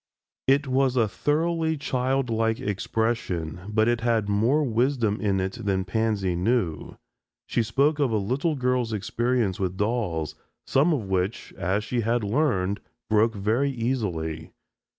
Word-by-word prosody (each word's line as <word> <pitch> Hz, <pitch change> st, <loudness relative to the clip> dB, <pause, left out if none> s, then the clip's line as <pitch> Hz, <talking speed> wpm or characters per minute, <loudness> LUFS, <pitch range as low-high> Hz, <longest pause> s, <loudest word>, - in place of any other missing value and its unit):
It 140 Hz, +2 st, +4 dB
was 130 Hz, 0 st, +2 dB
a 115 Hz, -3 st, +3 dB
thoroughly 160 Hz, -, 0 dB
childlike 125 Hz, -5 st, 0 dB
expression, 100 Hz, -5 st, -2 dB
but 110 Hz, +1 st, +2 dB
it 120 Hz, -1 st, +1 dB
had 115 Hz, -3 st, +1 dB
more 115 Hz, +9 st, +2 dB
wisdom 120 Hz, -3 st, +1 dB
in 100 Hz, -2 st, +1 dB
it 95 Hz, +5 st, -3 dB
than 95 Hz, -2 st, 0 dB
Pansy 100 Hz, -2 st, 0 dB
knew. 90 Hz, -4 st, -1 dB, 0.5 s
She -, -, 0 dB
spoke 140 Hz, +7 st, +2 dB
of 140 Hz, -3 st, +3 dB
a 110 Hz, -, +1 dB
little 130 Hz, +10 st, 0 dB
girl's 125 Hz, -3 st, 0 dB
experience 115 Hz, 0 st, 0 dB
with 95 Hz, -1 st, -2 dB
dolls, 105 Hz, -8 st, -1 dB, 0.3 s
some 145 Hz, +6 st, +3 dB
of 140 Hz, -8 st, 0 dB
which, 95 Hz, +3 st, -2 dB
as 95 Hz, +4 st, -1 dB
she 120 Hz, +2 st, -1 dB
had 115 Hz, +1 st, 0 dB
learned, 100 Hz, -5 st, +1 dB, 0.3 s
broke 110 Hz, +1 st, +3 dB
very 110 Hz, +8 st, +1 dB
easily. 95 Hz, -, -2 dB
115 Hz, 140 wpm, -25 LUFS, 100-130 Hz, 0.5 s, It